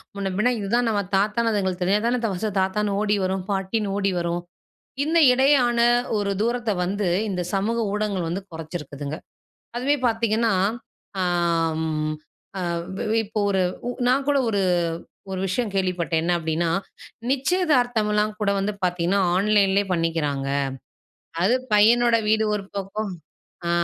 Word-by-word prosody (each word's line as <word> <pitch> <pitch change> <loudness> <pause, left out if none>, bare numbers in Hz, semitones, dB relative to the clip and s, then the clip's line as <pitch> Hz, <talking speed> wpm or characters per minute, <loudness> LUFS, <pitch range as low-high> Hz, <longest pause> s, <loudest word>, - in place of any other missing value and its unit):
முன்ன 200 -1 -3
பின்ன 245 +4 +3
இதுதான் 230 +4 +1
நம்ம 205 -2 +1
தாத்தா 210 +4 +1
அதுங்களுக்கு 190 -3 -1
தெரிஞ்சா 200 +3 +2
தானே, 245 +1 +1
ஃபஸ்ட்டு 210 +4 -2
தாத்தான்னு 200 +2 0
ஓடி 210 -1 +2
வரும் 190 0 -1
பாட்டின்னு 195 +1 -1
ஓடி 195 -1 +1
வரும். 170 0 -2 0.6
இன்ன 320 +2 0 0.2
இடையான 255 -2 +3 0.4
ஒரு 200 -1 -1
தூரத்த 235 0 0
வந்து, 195 +1 -1 0.2
இந்த 180 -2 -2
சமூக 215 +4 0
ஊடகங்கள் 205 -5 -1
வந்து 185 +4 -3
குறைச்சிருக்குதுங்க. 155 -2 -6 0.6
அதுவே 275 +4 +1
பாத்தீங்கன்னா, 225 -1 +1 0.7
அ - - +1 0.6
ம் 155 -1 -1 0.4
எ 185 - -2 0.5
வெ 225 - +2
இப்ப 215 +1 -4
ஒரு 190 -1 +1 0.3
உ - - 0 0.2
நான் 270 +2 +2
கூட 285 -1 +3
ஒரு 200 -2 +1 0.7
ஒரு 190 - -3
விஷயம் 210 +4 -1
கேள்விப்பட்டேன். 175 -4 0
என்ன 175 +2 +1
அப்டின்னா, 165 +1 -1 0.6
நிச்சயதார்த்தமலாம் 245 - +1
கூட 205 -1 +1
வந்து 195 +2 -1
பாத்தீங்கன்னா, 180 +2 +1 0.2
ஆன்லைன்லயே 200 0 +3
பண்ணிக்கிறாங்க. 155 -5 -1 0.9
அது 220 +7 +4 0.2
பையனோட 230 +3 +5
வீடு 220 0 +3
ஒரு 200 - -6
பக்கம் 200 +1 -3 0.6
அ - - 0
200 Hz, 135 wpm, -23 LUFS, 180-225 Hz, 0.9 s, பையனோட